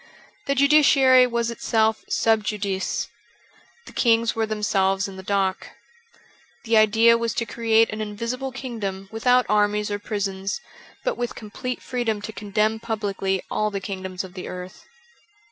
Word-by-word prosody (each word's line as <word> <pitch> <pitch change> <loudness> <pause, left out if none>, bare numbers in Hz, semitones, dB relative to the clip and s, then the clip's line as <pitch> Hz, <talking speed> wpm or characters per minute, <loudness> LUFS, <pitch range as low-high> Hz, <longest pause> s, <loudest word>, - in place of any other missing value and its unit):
The 275 - +1
judiciary 275 -3 +6
was 235 -1 -1
itself 220 -1 +1
sub 220 -1 +2
Juclice. 200 -3 -2 0.8
The - - -11
kings 230 -1 +2
were 225 -1 0
themselves 195 -2 +1
in 195 - -9
the 190 - -8
dock. 190 -1 -1 1.0
The 230 -1 +1
idea 225 +2 +5
was 230 -1 -2
to 235 - -1
create 225 0 +2
an 215 0 -4
invisible 230 +5 -4
kingdom 205 -7 -5
without 250 +3 +3
armies 210 0 +1
or 205 - -2
prisons, 195 -2 -3 0.4
but - - -2
with 240 -1 -3
complete 250 +4 -6
freedom 235 -4 -2
to 220 +1 -6
condemn 210 +2 0
publicly 200 -4 -2
all 215 0 0
the 200 -1 -4
kingdoms 190 -1 -5
of 185 -1 -10
the 185 - -7
earth. 180 +2 -9
215 Hz, 145 wpm, -23 LUFS, 200-235 Hz, 1.0 s, judiciary